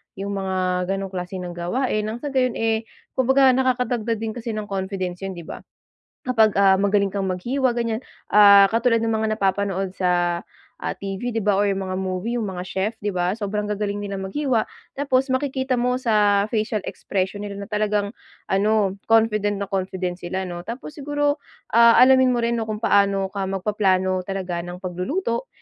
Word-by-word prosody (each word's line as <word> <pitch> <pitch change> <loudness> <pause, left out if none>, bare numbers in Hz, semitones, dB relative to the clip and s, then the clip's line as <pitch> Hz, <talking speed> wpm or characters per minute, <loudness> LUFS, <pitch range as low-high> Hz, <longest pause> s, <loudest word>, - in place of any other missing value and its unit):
Yung 200 +1 -4
mga 185 -1 -1
ganung 195 -1 -5
klase 180 0 -5
ng 175 - -5
gawain. 210 +5 -1
Ng 225 +2 -5
sa 290 - -2
gayon 255 -2 +1
eh, 225 0 0 0.3
kumbaga 265 +1 +5
nakakadagdag 250 -3 0
din 220 0 -3
kasi 235 -1 -5
ng 215 - -3
confidence 190 -2 -3
yun 195 - -4
di 170 - -8
ba? - - -7 0.7
Kapag 225 -5 +3
ah, 195 -1 +5
magaling 200 0 +2
kang 200 -1 -2
maghiwa 240 +8 0
ganyan 230 -2 -1 0.3
ah, 200 -1 +8
katulad 230 0 +2
ng 225 - 0
mga 220 0 0
napapanood 195 -2 0
sa 175 -1 +1 0.4
ah, - - -3
TV 200 +5 -4
di 225 - 0
ba 205 -2 +3
or 205 - +3
yung 195 -1 -1
mga 185 - -3
movie 190 +5 -2
yung 220 - -2
mga 180 -1 -5
chef 195 +5 -1
di 205 - 0
ba? 180 +1 0
Sobrang 210 -1 -3
gagaling 205 0 -2
nila 200 -1 -4
maghiwa. 235 +4 0 0.3
Tapos 270 -1 +1
makikita 260 -1 0
mo 250 +1 +1
sa 210 -4 +3
facial 215 -2 -1
expression 190 +1 -3
nila 200 -1 -6
na 200 - -7
talagang 210 0 -1 0.4
ano 200 0 +2 0.2
confident 215 -2 +3
na 200 - -3
confident 185 -2 -2
sila 185 +2 -3
no. 175 -1 -6
Tapos 235 +9 -7
siguro 290 0 -1 0.4
ah, 235 0 +7
alamin 260 0 +6
mo - - 0
rin 235 0 0
kung 215 -1 -4
paano 200 -2 +3
ka 200 -1 -2
magpaplano 190 -2 +1
talaga 185 -3 -3
ng 175 +1 -8
pagluluto 195 - -2
205 Hz, 180 wpm, -23 LUFS, 190-235 Hz, 0.7 s, ah